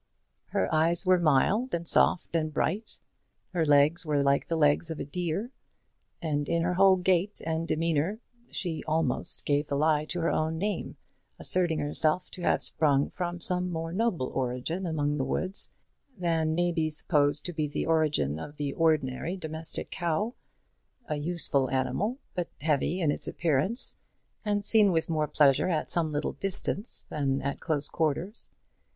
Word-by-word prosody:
Her 95 - 0
eyes 165 +4 +2
were 185 -1 +5
mild, 175 - +2
and 170 0 -4
soft, 170 - +3
and 155 -1 0
bright. 195 +8 -2 0.5
Her 170 -2 +1
legs 150 +3 +4
were 150 -3 +1
like 140 0 +2
the 165 - -1
legs 150 +2 +3
of 160 - -5
a - - -3
deer; 180 - -3 0.7
and 145 -3 -1
in 170 0 +1
her 180 +1 +1
whole 190 +1 +6
gait 185 +2 +1
and 160 +1 -1
demeanour 165 +4 0 0.3
she 170 -4 -2
almost 155 -4 0
gave 145 +1 +1
the 140 - -1
lie 155 +1 +2
to 175 +2 -3
her 165 - +1
own 160 +1 0
name, 205 +4 -3 0.4
asserting 175 -3 +3
herself 155 +3 0
to 180 - -7
have - - +2
sprung 140 -3 +2
from 175 -1 -4
some 180 +1 -1
more 165 0 -4
noble 195 - 0
origin 130 +8 -2
among 150 -2 0
the - - +1
woods, 185 +8 -1 0.5
than 165 -3 0
may 175 +1 +2
be 160 -2 0
supposed 150 -1 +1
to 175 - -3
be 155 -1 -1
the 145 - -3
origin 150 - +1
of 145 - -8
the 145 -2 -2
ordinary 160 +1 0
domestic 160 -2 -5
cow, 175 +7 -1 0.7
a 150 - -2
useful 145 -4 +1
animal, 195 - -1 0.2
but 175 -2 -3
heavy 155 +4 0
in 155 -3 +3
its - - -3
appearance, 170 - -1 0.5
and 205 -1 -1
seen 210 -3 +5
with 165 -1 0
more 155 -1 +1
pleasure 145 +3 +3
at 155 -4 -1
some 165 -3 0
little 145 0 -2
distance 195 +2 -3
than 140 -2 0
at 140 0 -2
close 155 -4 -1
quarters. 165 +6 0
160 Hz, 165 wpm, -28 LUFS, 145-180 Hz, 0.7 s, whole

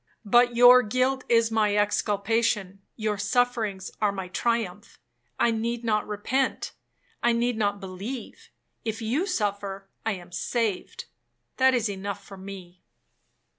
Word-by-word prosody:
But 240 +3 +4
your 245 +1 +8
guilt 255 +4 0
is 230 -1 +4
my 210 -2 +2
exculpation, 205 -1 0
your 215 -2 -2
sufferings 215 -3 0
are 210 -1 +3
my 190 -2 -6
triumph. 210 -2 -2 0.4
I 235 - +3
need 230 +1 -2
not 215 -2 0
repent, 250 +6 -1 0.5
I 240 - +3
need 240 +1 +1
not 205 -2 0
believe; 195 +6 -7 0.3
if 220 -1 -3
you 275 - 0
suffer, 200 - -2 0.2
I 225 - 0
am 175 -2 -10
saved,—that 180 - -2
is 235 -2 +1
enough 200 -1 -5
for 195 - -10
me. 185 -2 -10
215 Hz, 130 wpm, -26 LUFS, 195-235 Hz, 0.5 s, your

